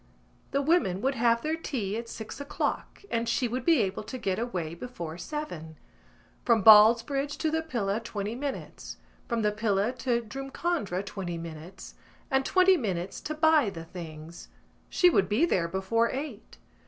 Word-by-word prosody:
The 280 +1 0
women 275 - +2
would 270 +3 +1
have 235 -1 +2
their 315 +1 0
tea 235 -11 -3
at 230 +1 -5
six 220 +6 -7
o'clock 285 - -3
and 230 0 0
she 250 - +1
would 245 +2 -3
be 320 -7 +4
able 190 -1 -3
to 255 - -6
get 195 -5 -1
away 180 -9 -3
before 170 -5 -7
seven. 175 - -6 0.7
From 230 -4 +3
Ballsbridge 235 +7 +6
to 315 - 0
the 320 0 +1
Pillar, 225 -10 -2
twenty 215 -2 -4
minutes; 275 +3 -6 0.3
from 230 -2 -1
the 210 - +3
Pillar 210 0 0
to 235 -1 0
Drumcondra, 270 - -3
twenty 185 -4 -5
minutes; 165 +3 -9 0.4
and 265 0 +3
twenty 370 +5 +4
minutes 190 - -3
to 310 - -4
buy 310 -6 +4
the 165 -4 -8
things. 165 -1 -9 0.4
She 360 - +4
would 195 - +2
be 225 +11 +3
there 175 - +1
before 190 +6 +1
eight. 260 -6 -6
230 Hz, 165 wpm, -28 LUFS, 190-275 Hz, 0.7 s, Ballsbridge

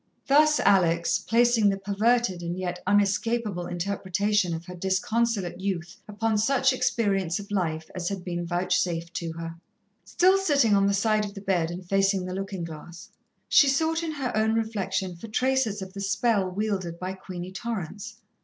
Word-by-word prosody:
Thus 300 +2 +4
Alex, 170 -4 +3
placing 230 -2 +3
the 195 - 0
perverted 205 0 +1
and 170 +1 -4
yet 180 -1 -4
unescapable 205 -1 +1
interpretation 195 +2 0
of 165 +1 -8
her 180 - -8
disconsolate 190 +1 -1
youth 190 0 -3
upon 215 +1 0
such 265 +3 +3
experience 195 -8 0
of 205 0 -9
life 160 -5 -1
as 175 -1 -3
had 195 -2 -5
been 175 -1 -3
vouchsafed 175 -1 -1
to 165 -1 -4
her. 165 0 -7 0.5
Still 375 +2 +3
sitting 280 - +3
on 195 0 +3
the 200 - +2
side 215 +1 +2
of 205 0 -6
the - - -6
bed 180 -4 0
and 175 +1 -7
facing 195 -1 +2
the 180 - -5
looking 195 -1 -4
glass, 165 +1 -9 0.4
she 285 - +6
sought 320 +4 +1
in 325 -2 -3
her 270 -6 -3
own 220 +1 +2
reflection 195 -5 -2
for 200 +7 -9
traces 235 -3 0
of 190 0 -10
the 200 - -6
spell 205 -1 +1
wielded 190 -3 -2
by 185 +2 -4
Queenie 185 -1 -8
Torrance. 205 -1 -5
195 Hz, 170 wpm, -26 LUFS, 180-225 Hz, 0.5 s, she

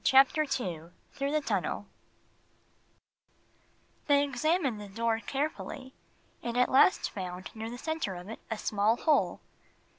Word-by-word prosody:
Chapter 275 +3 +5
II 170 -7 -5 0.2
Through 280 0 -2
the 305 0 +2
Tunnel 200 -1 -1 2.2
THEY 285 -1 +5
examined 280 - 0
the 205 - -7
door 225 +3 0
carefully, 270 0 -4 0.5
and 235 0 -3
at 250 - +3
last 275 +8 +5
found 185 -1 -6
near 220 +1 -5
the 240 - -6
center 315 - -2
of 175 +1 -8
it 225 - -7
a 220 - -2
small 210 +2 +2
hole. 305 +2 +2
240 Hz, 130 wpm, -30 LUFS, 205-285 Hz, 2.2 s, Chapter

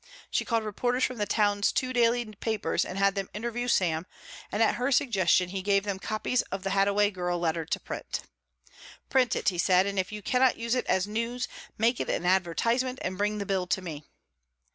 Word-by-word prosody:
She - - 0
called 230 -2 0
reporters 245 +4 -1
from 255 - 0
the 205 -1 -1
town's 205 -1 +2
two 255 0 -1
daily 240 0 +3
papers 215 0 -1
and 185 - -6
had 195 0 +3
them 195 -1 -3
interview 235 +3 -3
Sam, 170 -7 +1 0.4
and 215 - +2
at - - +3
her 250 +3 0
suggestion 200 -8 +3
he 190 +1 -3
gave 195 0 +2
them 200 -2 -3
copies 215 +4 0
of 190 0 -4
the 195 - -2
Hadaway 200 +1 +3
girl 180 -2 -2
letter 165 -1 -1
to - - -2
print. - - -5 0.9
"Print 255 -3 +3
it," - - +2
he 180 -3 -5
said, 185 +1 +4
"and 200 -1 -1
if 185 - -1
you 210 -1 -7
cannot 255 +3 +3
use 230 0 -1
it 255 - 0
as 185 0 +2
news, 230 +4 -2 0.3
make 230 +2 +2
it - - -2
an 175 - -1
advertisement 230 +8 +1
and 185 +1 -2
bring 210 +2 0
the 200 - -3
bill 190 -2 -1
to 190 - +1
me." 155 -4 -6
205 Hz, 210 wpm, -28 LUFS, 185-235 Hz, 0.9 s, said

